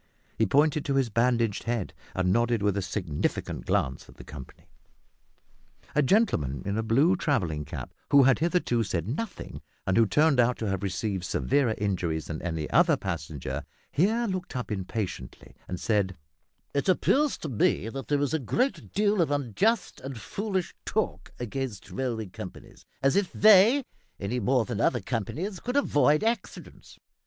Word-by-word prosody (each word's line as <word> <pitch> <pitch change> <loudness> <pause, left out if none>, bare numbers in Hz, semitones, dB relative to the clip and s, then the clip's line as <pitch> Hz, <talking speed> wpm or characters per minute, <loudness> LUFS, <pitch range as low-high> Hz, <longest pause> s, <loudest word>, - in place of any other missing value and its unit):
He 110 - +2
pointed 150 +5 +3
to 140 - 0
his 130 -4 +1
bandaged 115 -2 +1
head, 115 -5 -2 0.2
and 95 0 +2
nodded 120 -1 +1
with 100 -2 +2
a 100 - 0
significant 90 -4 -3
glance 65 0 -1
at - - -15
the - - -12
company. 65 -3 -11 1.3
A 150 - +3
gentleman 125 - +2
in 100 +1 -1
a 110 - 0
blue 135 +11 +3
travelling 85 - -1
cap, - - -7 0.2
who 140 -1 +7
had 135 0 +4
hitherto 165 -8 +1
said 85 -4 -2
nothing, 190 - -5 0.2
and 95 - +1
who 115 -1 +5
turned 150 +5 +3
out 125 0 +3
to 110 - -3
have 95 -2 -1
received 95 -1 -2
severer 125 +4 +1
injuries 90 -6 -1
than 80 - -5
any 80 -3 -3
other 165 +2 +5
passenger, 75 - -4 0.3
here 220 +9 +2
looked 185 - -4
up 125 -3 -4
impatiently, 95 - -5
and 90 - -4
said 100 -4 0 0.6
"It 140 +6 0
appears 280 +10 +3
to 155 - -6
me 110 -2 +1
that 135 +4 -6
there 145 -1 +1
is 145 +1 0
a 160 - +2
great 250 - -1
deal 205 -1 +2
of 165 - +2
unjust 145 - 0
and 135 -3 -6
foolish 190 - -3
talk - - -2
against 120 -3 -5
railway 120 -4 -2
companies, 90 - -10 0.2
as 135 +4 +3
if 200 -2 +1
they, 215 +6 +6 0.4
any 110 +6 -2
more 125 +1 +2
than 120 -5 -3
other 120 - +2
companies, 150 - -3
could 250 +7 -2
avoid 150 - +3
accidents. 225 -2 -4
120 Hz, 165 wpm, -27 LUFS, 100-160 Hz, 1.3 s, who